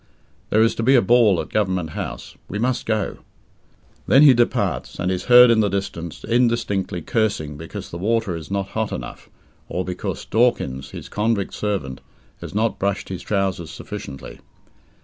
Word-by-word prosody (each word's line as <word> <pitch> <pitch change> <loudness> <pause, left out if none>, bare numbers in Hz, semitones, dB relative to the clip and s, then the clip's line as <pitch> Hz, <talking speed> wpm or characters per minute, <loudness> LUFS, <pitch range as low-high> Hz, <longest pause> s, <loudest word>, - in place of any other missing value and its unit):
There 110 +1 +4
is 115 - +3
to - - -4
be 130 +4 +4
a 125 - +6
ball 110 -4 +4
at - - -4
Government 95 -6 -1
House. - - -6
We 105 - -3
must 125 +3 -1
go." 110 -2 -1 0.9
Then 135 +3 +6
he 140 -3 +9
departs, 120 -1 0
and 90 - -1
is 90 -1 -3
heard 125 -1 +8
in 115 - +4
the 105 -2 +2
distance 85 -4 -4
indistinctly 115 -7 0
cursing 100 -10 -1
because 80 +3 -8
the 85 - -6
water 110 -2 0
is 80 -2 -8
not 100 0 -2
hot 110 -1 -2
enough, 65 -1 -7 0.4
or 90 0 -2
because 90 -1 -4
Dawkins, 110 - +1
his - - -9
convict 105 -2 -1
servant, 95 -11 -3 0.4
has - - -9
not 110 +2 0
brushed 100 0 -1
his 95 -2 -5
trousers 95 -5 -1
sufficiently. 80 -6 -8
100 Hz, 170 wpm, -22 LUFS, 90-115 Hz, 0.9 s, he